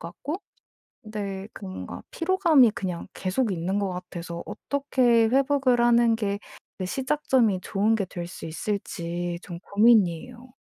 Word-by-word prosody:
같고 325 +7 -6 0.6
네 200 -2 -5
그 200 - -9
뭔가 190 0 -7
피로감이 330 - +4
그냥 180 -5 -4
계속 200 +5 -1
있는 185 +3 -1
것 200 -1 -1
같아서 175 -2 -6
어떻게 250 -5 +2
회복을 270 0 +3
하는 235 -1 +5
게 200 -2 -1 0.4
그 185 - -2
시작점이 260 -4 +1
좋은 210 +3 +1
게 200 -3 -1
될 175 -1 -6
수 175 - -8
있을지 175 -1 -3
좀 170 -2 -7
고민이에요. 225 +4 +2
210 Hz, 270 characters per minute, -26 LUFS, 185-250 Hz, 0.6 s, 하는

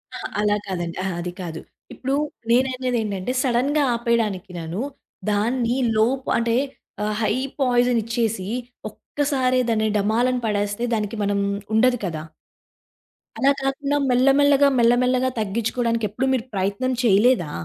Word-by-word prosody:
ఆ! - - -4 0.2
అలా 210 0 +2
కాదండి. 175 -3 -3
ఆహ! 190 - -1
అది 175 +1 -4
కాదు. 165 -2 -6 0.3
ఇప్పుడు 270 +1 -2 0.4
నేననేదేంటంటే 250 -4 0
సడెన్‌గా 275 +4 +2
ఆపేయడానికి 225 -5 -1
నను 165 +5 -4 0.5
దాన్ని 235 +4 +1 0.2
లోప్ 255 +5 +1
అంటే 230 0 +1 0.5
ఆహ్, 210 0 -1
హై 215 - +2 0.3
పాయిజన్ 245 -2 +3
ఇచ్చేసి 225 -4 -1 0.4
ఒక్కసారే 260 0 -1
దాన్ని 220 -1 +1
డమాలని 235 +5 +1
పడేస్తే 205 +1 -1
దానికి 210 0 -2
మనం 200 0 0 0.3
ఉండదు 245 +3 +4
కదా! 160 -4 -3 1.2
అలా 270 +4 +4
కాకుండా 280 +1 -1
మెల్ల 250 +1 +3
మెల్లగా 285 0 +5
మెల్ల 235 0 +5
మెల్లగా 255 +1 +2
తగ్గించుకోడానికి 230 +2 -1
ఎప్పుడు 260 - -2
మీరు 250 -3 -1
ప్రయత్నం 200 +6 -1
చేయలేదా? 210 -5 +3
235 Hz, 125 wpm, -22 LUFS, 205-255 Hz, 1.2 s, మెల్లగా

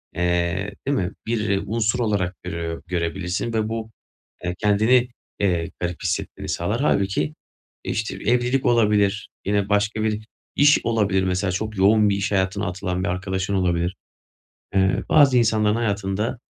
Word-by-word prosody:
eee, 90 +3 0 0.2
değil 140 - +2
mi, 90 -1 -1
bir 105 -4 0
unsur 110 +2 0
olarak 100 -5 0
görüyor 85 -2 -4
görebilirsin 90 +5 -2
ve 110 -1 0
bu, 115 -1 -4 0.5
eee, 90 0 -2
kendini, 110 +5 +3 0.3
eee, 85 -4 0
garip 90 -1 -3
hissetmeni - - -3
sağlar. 105 +9 -1
Hâlbuki, 95 - +1 0.5
işte, 110 +1 -2
evlilik 125 +3 +1
olabilir, 105 -3 +2 0.2
yine 100 0 0
başka 105 +2 +1
bir 110 0 -1 0.3
iş 145 +1 +6
olabilir, 105 -5 +1
mesela 95 +1 0
çok 110 +3 -3
yoğun 105 +2 +5
bir 100 - +1
iş 100 +1 -2
hayatına 100 +1 0
atılan 90 0 -3
bir - - -1
arkadaşın 95 +1 -2
olabilir. 90 -1 0 0.8
Eee, 95 -1 +2
bazı 140 -4 +5
insanların 110 -2 +2
hayatında, 105 0 -1
100 Hz, 140 wpm, -23 LUFS, 90-110 Hz, 0.8 s, iş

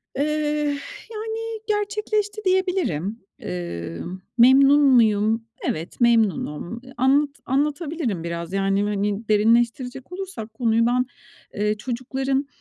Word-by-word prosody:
Eh, 280 - +1 0.9
yani, 445 +1 -4
gerçekleşti, 420 0 -1
diyebilirim. 360 - 0 0.2
Emm, 85 - -5 0.2
memnun 275 +4 +7
muyum? 225 -4 +4 0.2
Evet, 165 +9 -4
memnunum. 225 -3 +1 0.2
Anlat 275 +3 +3 0.2
anlatabilirim 285 - -1
biraz. 170 +1 -5
Yani, 195 +1 +1
hani, 205 +1 -1
derinleştirecek 235 +5 +1
olursak 360 - -6
konuyu 230 0 +2
ben, 250 +1 +2 0.5
eee, 210 +1 0
çocukların, 265 +4 -2
240 Hz, 95 wpm, -23 LUFS, 205-290 Hz, 0.9 s, memnun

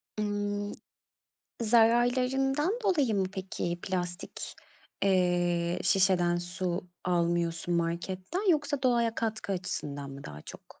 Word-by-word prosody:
Imm, 205 -1 -2 0.9
zararlarından 250 - +3
dolayı 290 - +2
mı 195 - +2
peki, 185 -3 -3
plastik, 180 -1 -4 0.5
eee, 175 -2 +2
şişeden 185 -3 +3
su 175 0 -3 0.2
almıyorsun 170 -1 0
marketten, 185 - -1
yoksa 290 -3 0
doğaya 235 -3 +2
katkı 220 -3 -2
açısından 145 -7 -4
mı 140 0 -9
daha 75 0 -8
çok? - - -13
190 Hz, 100 wpm, -30 LUFS, 175-235 Hz, 0.9 s, zararlarından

